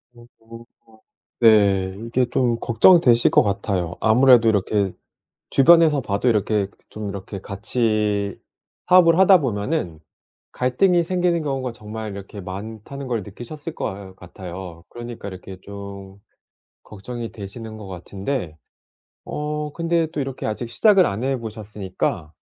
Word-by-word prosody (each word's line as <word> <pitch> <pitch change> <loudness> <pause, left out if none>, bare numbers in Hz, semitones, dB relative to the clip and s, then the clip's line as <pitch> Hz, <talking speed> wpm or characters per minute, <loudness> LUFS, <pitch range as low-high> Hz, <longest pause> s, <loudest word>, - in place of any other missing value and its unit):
어 120 - -15 1.2
네 100 -4 +4
이게 125 +2 +1
좀 120 -2 +1
걱정되실 120 0 +5
것 - - +5
같아요. 100 -3 -2
아무래도 120 0 +6
이렇게 100 -2 +1 0.6
주변에서 155 0 +5
봐도 105 +2 -1
이렇게 105 -2 +1 0.2
좀 105 -2 -6
이렇게 100 0 -7
같이 105 -1 -1 0.5
사업을 175 -2 +6
하다 190 -2 +7
보면은 105 - -2 0.5
갈등이 170 +8 +2
생기는 175 -2 0
경우가 135 -4 -3
정말 110 -1 -7
이렇게 100 +1 -9
많다는 110 +8 -7
걸 115 -5 -2
느끼셨을 145 - -8
것 95 -2 -6
같아요. 90 -1 -9
그러니까 120 -3 -8
이렇게 95 0 -10
좀 100 -1 -9 0.7
걱정이 115 +3 -7
되시는 110 +2 -9
것 105 -2 -10
같은데 95 - -5 0.7
어 150 0 -4
근데 165 -1 +1
또 150 - -3
이렇게 135 -1 -4
시작을 190 - +3
안 105 +5 -3
해 135 0 0
보셨으니까 100 -7 -4
110 Hz, 280 characters per minute, -22 LUFS, 100-135 Hz, 1.2 s, 하다